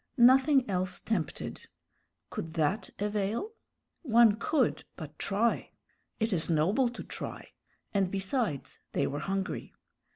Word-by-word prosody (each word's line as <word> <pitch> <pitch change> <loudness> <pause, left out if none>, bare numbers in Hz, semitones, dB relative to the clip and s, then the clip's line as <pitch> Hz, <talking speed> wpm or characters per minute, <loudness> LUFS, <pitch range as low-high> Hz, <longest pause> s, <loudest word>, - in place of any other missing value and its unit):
Nothing 260 +2 +6
else 185 -2 -1
tempted; 180 -9 -3 0.6
could 160 0 -5
that 165 +7 0
avail? 210 - -1 0.5
One 235 - +5
could 255 +3 +1
but 155 -3 -9
try. 215 +4 +1 0.5
It 220 -1 +1
is 165 -2 -1
noble 190 - +3
to 240 - -8
try; - - -6 0.4
and 195 -2 +2
besides, 195 - -2
they 140 - +1
were 145 +1 -2
hungry. 195 +4 -3
205 Hz, 120 wpm, -30 LUFS, 180-235 Hz, 0.6 s, Nothing